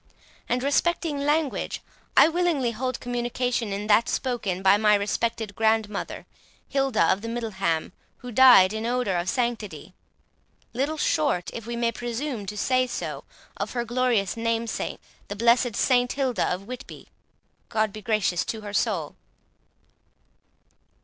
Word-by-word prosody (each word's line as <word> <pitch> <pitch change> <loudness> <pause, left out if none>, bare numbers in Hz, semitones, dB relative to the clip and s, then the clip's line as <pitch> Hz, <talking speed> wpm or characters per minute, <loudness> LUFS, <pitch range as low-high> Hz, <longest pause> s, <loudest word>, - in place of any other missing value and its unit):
And 250 +1 0
respecting 300 +1 +1
language, 300 -2 0 0.4
I - - +9
willingly 325 -7 +1
hold 255 +2 -3
communication 245 -2 -2
in 200 +1 -3
that 215 +2 +4
spoken 210 -8 -2
by 190 +1 +6
my 210 0 +4
respected 210 +1 -2
grandmother, 220 -1 0 0.4
Hilda 270 -4 +1
of 200 - -7
Middleham, 195 -9 -2 0.2
who 250 - -9
died 240 -6 +7
in 220 +1 -3
odour 245 -6 0
of 175 +1 -1
sanctity, 235 -4 -3 0.8
little 280 +6 -1
short, 175 - 0
if 230 -1 -7
we 235 - -3
may 235 0 +1
presume 240 -1 -4
to 210 +2 -5
say 255 +3 +2
so, - - -5 0.3
of - - -4
her 240 -1 -2
glorious 240 -5 +1
namesake, 230 0 -2 0.3
the 205 - -5
blessed 235 +1 +3
Saint 245 -1 +2
Hilda 265 -4 0
of 180 +2 -3
Whitby, 250 +3 -9 0.6
God 215 -3 0
be 215 - -8
gracious 205 -4 +1
to 220 - -4
her 205 -1 -7
soul!" 195 -9 -1
230 Hz, 135 wpm, -25 LUFS, 210-250 Hz, 0.8 s, I